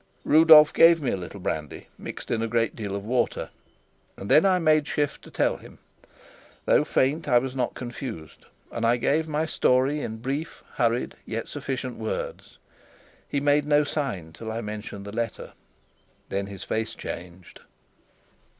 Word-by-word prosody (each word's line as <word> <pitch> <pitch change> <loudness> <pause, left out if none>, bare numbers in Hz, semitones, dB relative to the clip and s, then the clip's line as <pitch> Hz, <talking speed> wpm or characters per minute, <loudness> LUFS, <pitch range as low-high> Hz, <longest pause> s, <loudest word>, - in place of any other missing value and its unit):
Rudolf 155 -1 +8
gave 165 0 +7
me 140 - -1
a - - 0
little 95 +2 -8
brandy 75 -5 -4
mixed - - -8
in 115 - 0
a 115 - 0
great 115 0 0
deal 100 -3 -4
of 100 0 -5
water, 120 +1 -1 0.7
and 100 - -5
then 160 +6 +6
I 185 -1 +4
made 155 -3 +3
shift 145 -1 -1
to - - -14
tell - - 0
him. - - -15 0.9
Though - - +4
faint, 145 +5 0
I 120 - +5
was 130 +1 -1
not 125 -2 -1
confused, 120 - -8 0.2
and 115 - -4
I 115 +1 +3
gave 155 +6 +1
my 155 +1 -1
story 135 -1 +2
in 110 -4 -5
brief, 135 +7 -4
hurried, - - +1
yet - - -4
sufficient - - -4
words. - - -5 0.7
He 140 - 0
made 145 +1 +2
no 150 0 +4
sign 120 - -3
till 110 +5 -7
I 115 - -3
mentioned 105 -2 -6
the 100 - -7
letter. 115 +1 -4 0.8
Then 100 0 -2
his 100 -1 -7
face 110 0 -2
changed. 90 0 -8
125 Hz, 165 wpm, -25 LUFS, 105-150 Hz, 0.9 s, Rudolf